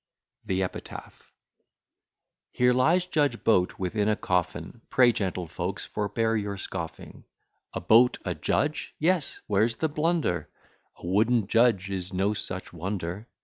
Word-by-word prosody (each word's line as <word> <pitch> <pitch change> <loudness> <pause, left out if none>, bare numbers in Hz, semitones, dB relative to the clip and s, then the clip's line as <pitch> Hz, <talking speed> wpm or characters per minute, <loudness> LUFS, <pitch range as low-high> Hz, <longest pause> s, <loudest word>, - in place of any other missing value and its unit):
THE 95 0 0
EPITAPH 90 - -8 1.2
Here 125 0 +3
lies 165 +9 +3
Judge 145 -8 0
Boat 90 -5 +2
within 105 +3 0
a 105 - +3
coffin: 90 +5 -2
Pray, 125 -2 +5
gentlefolks, 90 -1 -3
forbear 110 +2 -1
your 100 -2 -2
scoffing. 85 -4 -7 0.5
A - - -2
Boat 115 +7 +5
a 90 - -1
judge! 145 - -1
yes; 170 -1 0
where's 110 +3 +2
the 160 +6 -1
blunder? 150 - 0 0.5
A - - -11
wooden 110 +5 +2
judge 105 -3 +2
is 95 -1 -4
no 95 +3 +1
such 95 -3 -5
wonder. 95 +3 -4
105 Hz, 130 wpm, -27 LUFS, 90-125 Hz, 1.2 s, Pray